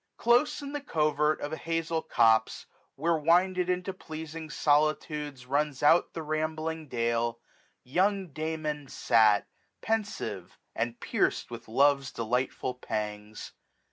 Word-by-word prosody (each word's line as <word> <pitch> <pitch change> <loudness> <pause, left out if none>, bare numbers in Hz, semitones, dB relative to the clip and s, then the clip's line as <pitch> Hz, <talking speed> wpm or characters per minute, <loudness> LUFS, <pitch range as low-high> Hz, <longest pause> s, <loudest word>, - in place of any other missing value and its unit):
Close 240 +5 +3
in 280 - -6
the 290 - -3
covert 150 - +1
of 145 - -4
an - - -4
hazel 165 0 -1
copse. 115 -5 +2 0.3
Where 165 +3 +1
winded 180 +3 +3
into 180 +1 -1
pleasing 160 -2 -8
solitudes 150 -2 0
Runs 145 +1 -1
out 165 +4 +4
the 165 - -5
rambling 155 +1 -2
dale, 115 -1 -1 0.4
young 190 +7 +1
Damon 155 -1 -3
fat, 110 -5 +3 0.4
1270 205 - -2
Penfive, - - -26 0.2
and 115 +1 -2
piercM - - 0
with 115 0 -8
love's 140 +3 +3
delightful 125 +2 -1
pangs. 105 -3 -5
150 Hz, 125 wpm, -29 LUFS, 125-165 Hz, 0.4 s, out